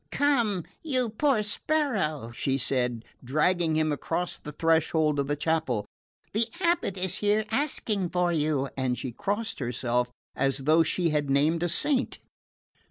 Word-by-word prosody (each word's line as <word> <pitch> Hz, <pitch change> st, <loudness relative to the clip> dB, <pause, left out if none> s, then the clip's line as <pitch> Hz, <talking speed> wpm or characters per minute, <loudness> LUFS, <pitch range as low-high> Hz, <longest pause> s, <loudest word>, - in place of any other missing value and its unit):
"Come, 235 Hz, -, +1 dB, 0.2 s
you 255 Hz, -6 st, 0 dB
poor 230 Hz, 0 st, +1 dB
sparrow," 210 Hz, -, -1 dB
she 135 Hz, +3 st, -1 dB
said, 125 Hz, -3 st, 0 dB, 0.2 s
dragging 160 Hz, +5 st, +1 dB
him 155 Hz, -1 st, +2 dB
across 165 Hz, +4 st, -2 dB
the 150 Hz, -, -8 dB
threshold 160 Hz, -1 st, +2 dB
of 140 Hz, -, 0 dB
the 145 Hz, -, 0 dB
chapel, 145 Hz, -8 st, 0 dB, 0.5 s
"the 225 Hz, +2 st, +2 dB
abate 340 Hz, -, +1 dB
is 185 Hz, 0 st, 0 dB
here 210 Hz, +1 st, +1 dB
asking 220 Hz, -, 0 dB
for 180 Hz, 0 st, +1 dB
you;" 150 Hz, -3 st, +1 dB
and 130 Hz, -2 st, -1 dB
she 130 Hz, -, -4 dB
crossed 215 Hz, -, -2 dB
herself, 125 Hz, -1 st, -1 dB, 0.3 s
as 135 Hz, 0 st, 0 dB
though 155 Hz, +4 st, +5 dB
she 170 Hz, +2 st, +1 dB
had 150 Hz, -2 st, 0 dB
named 150 Hz, +4 st, +2 dB
a 175 Hz, -, 0 dB
saint. 260 Hz, -, +1 dB
165 Hz, 150 wpm, -27 LUFS, 140-210 Hz, 0.5 s, though